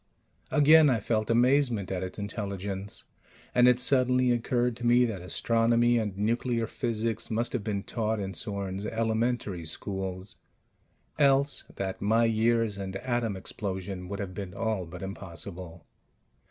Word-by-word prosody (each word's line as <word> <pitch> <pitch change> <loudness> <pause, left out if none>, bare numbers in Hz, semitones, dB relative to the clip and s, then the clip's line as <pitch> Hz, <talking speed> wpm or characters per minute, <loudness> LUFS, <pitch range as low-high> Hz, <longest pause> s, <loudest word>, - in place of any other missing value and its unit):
Again 155 0 +6
I 125 -4 +2
felt 110 +1 -1
amazement 120 -4 +2
at 90 -1 -2
its 95 0 -5
intelligence; 100 -1 -5 0.5
(and 125 0 +6
it 125 0 +5
suddenly 125 -1 +3
occurred 120 0 +1
to 120 - -9
me 120 +1 +5
that 105 -6 -4
astronomy 115 +5 +2
and 105 -4 -3
nuclear 115 +2 0
physics 115 -1 -2
must 115 +2 -1
have 105 - -2
been 100 -2 -2
taught 110 -1 -2
in 95 -1 -4
Sorn's 100 -1 -3
"elementary 110 -4 -1
schools" 95 +3 -4 0.8
else 140 0 +3
that 95 -1 -4
my 110 +3 +3
years 115 -2 +1
and 95 -1 -5
atom 120 -2 -1
explosion 95 -1 -4
would 100 - -4
have 100 -2 -5
been 95 -1 -6
all 100 -3 -2
but 90 +2 -8
impossible). 90 -3 -7
110 Hz, 140 wpm, -28 LUFS, 95-120 Hz, 0.8 s, Again